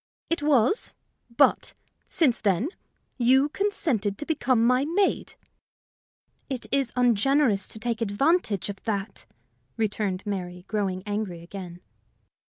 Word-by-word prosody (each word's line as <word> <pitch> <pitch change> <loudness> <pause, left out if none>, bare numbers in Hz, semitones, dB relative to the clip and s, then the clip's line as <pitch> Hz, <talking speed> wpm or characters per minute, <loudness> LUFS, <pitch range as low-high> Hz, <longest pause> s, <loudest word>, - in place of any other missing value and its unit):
"It 335 - +1
was; 290 - +2 0.3
but, 235 +4 +2 0.3
since 270 -8 +2
then, 205 - +1 0.5
you 265 +4 +4
consented 285 - -1
to 295 - -5
become 255 -7 +1
my 250 +2 +3
maid." 365 +6 0 1.1
"It 260 -3 -4
is 275 -3 +2
ungenerous 245 -2 +3
to - - -6
take 230 +1 -3
advantage 225 - +1
of 200 -1 -6
that," 200 -2 -3 0.5
returned 205 -3 -1
Mary, 180 -3 -5
growing 195 -4 -2
angry 205 -5 -3
again. 180 -1 -9
225 Hz, 115 wpm, -26 LUFS, 200-275 Hz, 1.1 s, you